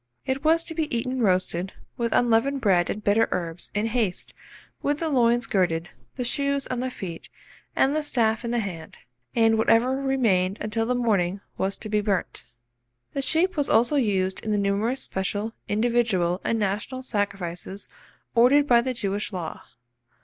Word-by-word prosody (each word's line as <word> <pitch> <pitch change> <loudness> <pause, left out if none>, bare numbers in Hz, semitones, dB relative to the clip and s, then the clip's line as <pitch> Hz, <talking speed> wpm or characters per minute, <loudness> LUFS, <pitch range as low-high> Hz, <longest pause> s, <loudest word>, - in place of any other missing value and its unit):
It 265 +2 -2
was 325 +1 +4
to 330 - -4
be 310 -6 -1
eaten 255 +2 -2
roasted, 185 -2 +1 0.2
with 235 -1 -1
unleavened 245 +4 +2
bread 185 -7 +2
and 210 - -4
bitter 210 +2 +3
herbs, 170 -1 -3
in 210 +1 +1
haste, 225 -5 -1 0.5
with 290 0 0
the 325 - -1
loins 240 -3 +3
girded, 175 -5 0 0.3
the 250 - -3
shoes 280 +2 0
on 250 - -3
the 255 +1 -1
feet, 180 -9 -8 0.5
and 275 +3 +3
the 310 - +1
staff 230 -6 +1
in 235 - -3
the 240 - 0
hand; 180 -8 -5 0.4
and 225 -1 +4
whatever 230 +4 +3
remained 225 -9 +1
until 225 +1 -2
the 250 - +1
morning 200 -6 +1 0.2
was 195 +1 -1
to 220 - -6
be 210 0 +1
burnt. 200 -9 -2 0.7
The 275 - -1
sheep 335 +7 +2
was 290 -3 0
also 240 +6 +4
used 190 -7 +1
in 220 - -4
the 210 - +2
numerous 205 +6 0
special, 205 +3 -3
individual, 210 -5 +1
and 230 - 0
national 215 +6 -2
sacrifices 195 -4 -3 0.5
ordered 255 +5 +5
by 240 -4 +5
the 255 +1 -3
Jewish 205 0 -2
law. 175 -5 -5
225 Hz, 170 wpm, -25 LUFS, 195-255 Hz, 0.7 s, ordered